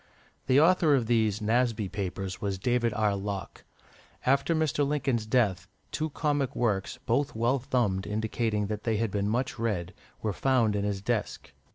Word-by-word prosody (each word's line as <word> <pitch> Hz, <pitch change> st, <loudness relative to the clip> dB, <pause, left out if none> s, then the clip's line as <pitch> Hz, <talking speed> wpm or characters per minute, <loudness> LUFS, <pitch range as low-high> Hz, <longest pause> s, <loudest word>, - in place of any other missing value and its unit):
The 130 Hz, +1 st, +5 dB
author 160 Hz, -2 st, +5 dB
of 125 Hz, -4 st, +1 dB
these 110 Hz, -2 st, +1 dB
"Nasby 115 Hz, -1 st, +1 dB
Papers" 95 Hz, -1 st, -4 dB
was 100 Hz, -2 st, -2 dB
David 120 Hz, +3 st, +1 dB
R. 105 Hz, -2 st, +2 dB
Locke. 100 Hz, -1 st, -5 dB, 0.6 s
After 140 Hz, +5 st, +2 dB
Mr. 155 Hz, -2 st, +1 dB
Lincoln's 135 Hz, -6 st, 0 dB
death, 100 Hz, -7 st, +1 dB, 0.2 s
two 155 Hz, +1 st, -2 dB
comic 145 Hz, -3 st, -1 dB
works, 105 Hz, -1 st, 0 dB
both 130 Hz, +3 st, 0 dB
well 120 Hz, +4 st, +1 dB
thumbed, 115 Hz, -7 st, 0 dB
indicating 110 Hz, 0 st, -1 dB
that 105 Hz, +1 st, -4 dB
they 110 Hz, -2 st, 0 dB
had 115 Hz, -1 st, -1 dB
been 100 Hz, 0 st, 0 dB
much 125 Hz, +4 st, -1 dB
read, 100 Hz, -6 st, -2 dB, 0.3 s
were 105 Hz, -2 st, 0 dB
found 120 Hz, -3 st, +2 dB
in 100 Hz, -, 0 dB
his 100 Hz, -1 st, -2 dB
desk. 115 Hz, 0 st, -2 dB
115 Hz, 165 wpm, -28 LUFS, 100-130 Hz, 0.6 s, The